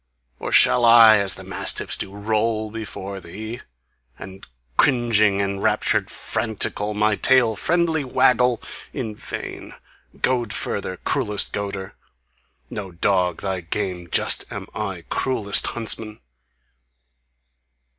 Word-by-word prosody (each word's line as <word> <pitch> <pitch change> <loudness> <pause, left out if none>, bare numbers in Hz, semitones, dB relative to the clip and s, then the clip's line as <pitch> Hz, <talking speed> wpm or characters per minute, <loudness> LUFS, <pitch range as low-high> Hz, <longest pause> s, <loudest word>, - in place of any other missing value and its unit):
Or - - -5
shall 125 - +5
I, 115 -2 +8
as 100 -3 -1
the - - -10
mastiffs - - 0
do, - - -6
Roll 110 +1 -1
me 115 - -6
before 100 -2 -7
thee? 110 +7 -8 0.6
And 95 +1 -11 0.3
cringing, 115 - +3
enraptured, 100 0 0
frantical, 105 -1 -1
My 105 0 +2
tail 125 -1 +3
friendly 165 - +1
waggle! 125 -2 +2 0.3
In 115 -6 -4
vain! - - -8 0.4
Goad 120 -4 0
further! 95 -2 -2
Cruellest 105 -5 -1
goader! 100 -2 -5 0.7
No 100 -3 -7
dog 90 0 0
thy 95 -2 -2
game 90 0 -4
just - - +1
am - - -7
I, 95 -5 -5
Cruellest 105 -6 +3
huntsman! 110 -2 0
105 Hz, 115 wpm, -22 LUFS, 100-115 Hz, 0.7 s, I